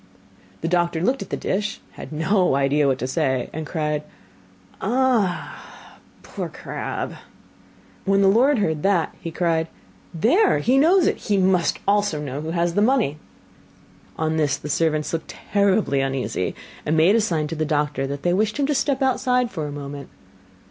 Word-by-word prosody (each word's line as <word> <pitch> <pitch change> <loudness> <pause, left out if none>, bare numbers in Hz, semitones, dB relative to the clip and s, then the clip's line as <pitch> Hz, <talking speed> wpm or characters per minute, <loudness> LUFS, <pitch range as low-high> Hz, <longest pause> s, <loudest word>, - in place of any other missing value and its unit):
The 165 - -2
doctor 175 -1 +1
looked 250 +8 0
at 195 - -7
the - - -2
dish, 210 +3 -2
had - - -10
no 170 +1 +2
idea 140 +1 +2
what 135 -1 +2
to 130 - -3
say, 130 -1 -1
and 155 0 -5
cried: 150 -2 -1 0.8
'Ah, 235 -5 -1 0.2
poor - - -5
Crabb.' - - -5 0.9
When 195 0 +3
the - - +5
lord 250 +8 +4
heard 160 -7 0
that, 195 -3 +1
he 170 - -4
cried: 165 -1 0 0.4
'There! 260 - +3
he 260 +3 +3
knows 350 +5 +5
it; - - +1
he 205 -2 -1
must 185 -2 +2
also 205 -6 +2
know 145 -1 -4
who 155 - -5
has 170 0 0
the 205 - +2
money!' 220 - +2 1.0
On 160 0 0
this 150 -3 +1
the 150 - -8
servants 155 0 0
looked 165 -1 -3 0.2
terribly 200 -8 +2
uneasy, 130 -8 -2 0.3
and 155 +2 0
made 165 +6 +5
a 230 - +4
sign 165 -7 0
to 165 - -4
the 155 - -1
doctor 150 -2 -1
that 140 0 -5
they 175 - +2
wished 215 +4 0
him 285 - +1
to 295 - +1
step 275 0 0
outside 250 -2 +1
for 155 -5 -4
a - - -6
moment. 140 0 -7
170 Hz, 175 wpm, -22 LUFS, 150-210 Hz, 1.0 s, the